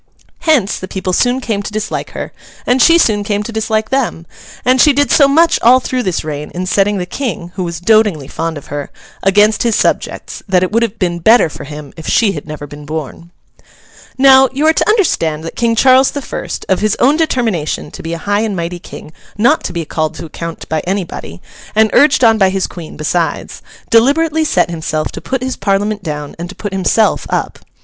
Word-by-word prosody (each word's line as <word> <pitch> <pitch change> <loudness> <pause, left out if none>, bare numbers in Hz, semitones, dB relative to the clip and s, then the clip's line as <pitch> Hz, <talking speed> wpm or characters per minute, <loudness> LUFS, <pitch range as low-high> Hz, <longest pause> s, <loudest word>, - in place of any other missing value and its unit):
Hence, 300 - +1
the 185 - -7
people 185 -1 -3
soon 245 +6 +2
came 215 -5 -2
to 205 - -6
dislike 215 0 -4
her, - - -6 0.3
and 250 +1 +2
she 335 0 +6
soon 210 -10 +2
came 205 0 -1
to 230 - -6
dislike 220 0 -1
them; 255 -11 -1 0.4
and 255 +1 +4
she 295 - +6
did 285 -2 +1
so 280 - +6
much 325 +4 +3
all 250 +3 +6
through 255 0 -2
this 185 -7 -2
reign 150 -1 -5
in 180 +1 -3
setting 200 +2 +1
the 180 - -3
King 180 -5 -4
(who 185 - -3
was 170 -2 -4
dotingly 200 -7 +2
fond 165 +1 -4
of 145 - -10
her) 145 -1 -4 0.3
against 205 +2 +3
his 230 -3 +1
subjects, - - -1
that 185 -1 +3
it 185 - -1
would 230 +2 +2
have 230 -1 -1
been 175 -2 -1
better 220 0 +5
for - - -9
him 150 -1 -9
if 160 - -9
she 220 -4 +3
had 150 -4 -7
never 150 -1 -7
been 145 +1 -11
born. 155 +2 -6 0.9
Now, 265 0 +6
you 280 +4 -1
are 320 - +5
to - - 0
understand 165 - +1
that 165 - -7
King 230 -1 +1
Charles 260 +2 +5
the 285 - -5
First—of 190 -6 -3
his 215 0 +1
own 275 +4 +3
determination 225 - -1
to - - -9
be 165 +1 -5
a - - -3
high 205 +1 +1
and 220 -3 -2
mighty 175 0 -4
King 155 -3 -11 0.2
not 240 +9 +3
to - - -3
be 170 -2 -4
called 155 0 -2
to - - -7
account 165 +1 -7
by 160 - -1
anybody, 175 - -5 0.3
and 220 0 +4
urged 290 -2 +4
on 225 -1 +5
by 190 -1 +4
his 190 0 -1
Queen 170 -3 -9
besides—deliberately 265 - 0
set 185 - +1
himself 155 -2 -3
to - - -8
put 265 -1 -3
his 260 0 -2
Parliament 205 +1 -1
down 150 -4 -5
and 175 +1 -5
to 200 - -10
put 205 -2 -6
himself 195 +3 +1
up. - - -2
205 Hz, 210 wpm, -15 LUFS, 170-245 Hz, 0.9 s, she